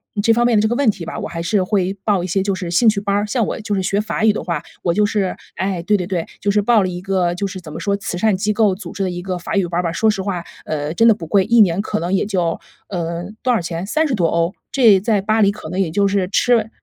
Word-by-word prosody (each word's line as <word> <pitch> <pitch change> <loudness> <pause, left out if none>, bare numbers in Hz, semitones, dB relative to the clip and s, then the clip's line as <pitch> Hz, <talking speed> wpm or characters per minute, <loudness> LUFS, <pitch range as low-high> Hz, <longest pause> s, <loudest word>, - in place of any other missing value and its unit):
嗯， 205 - 0
这 225 +1 +4
方 240 +1 +2
面 235 -3 +3
的 - - +4
这 220 - +2
个 240 - -1
问 275 -2 +3
题 175 -5 -9
吧， - - -5
我 - - -4
还 170 -1 -5
是 190 +3 +1
会 190 0 0
报 200 -5 +1
一 - - -3
些 190 +2 0
就 200 - 0
是 180 -2 -5
兴 225 +7 +3
趣 210 -2 0
班 200 0 0
儿。 205 +1 +1
像 225 0 0
我 - - -4
就 210 -1 -3
是 190 - 0
学 200 +2 0
法 215 +1 -1
语 220 - +6
的 - - -4
话， 170 -4 -2 0.2
我 170 - +1
就 210 +2 +3
是， 205 -3 -1 0.2
哎 190 -2 -2
对 210 +4 +2
对 180 - -3
对， 180 -4 -2
就 205 - -1
是 210 0 +2
报 225 0 +4
了 - - 0
一 175 0 -6
个， 185 -2 0
就 200 +2 -2
是 190 -1 -7
怎 160 -4 -11
么 165 - -6
说， 200 +3 0
慈 180 -3 -4
善 215 0 +2
机 210 +2 0
构 210 -3 +2
组 185 -3 -9
织 195 - -3
的 185 - 0
一 175 0 -5
个 185 -1 -3
法 205 +5 -5
语 190 -3 +2
班 170 +1 -2
儿 - - 0
吧。 165 - -1
说 220 +6 +2
实 200 -2 0
话， 185 -3 -3 0.2
呃， 150 0 -3
真 230 +5 +4
的 225 - +7
不 175 - -8
贵， 190 +3 +3
1 235 0 +5
年 185 0 +3
可 215 0 -2
能 175 +3 -2
也 195 - +2
就 180 -5 -1 0.3
呃， 170 -2 -3 0.2
多 255 - +2
少 225 - +1
钱， 170 +2 -4
30 310 +5 0
多 180 -5 +1
欧？ 170 +2 0 0.2
这 225 -8 +5
在 210 -1 +1
巴 215 +2 +1
黎 200 - +4
可 180 -6 -9
能 185 +2 -3
也 185 - +1
就 200 +3 +2
是 195 -2 0
吃 225 -2 +2
195 Hz, 330 characters per minute, -19 LUFS, 175-210 Hz, 0.3 s, 的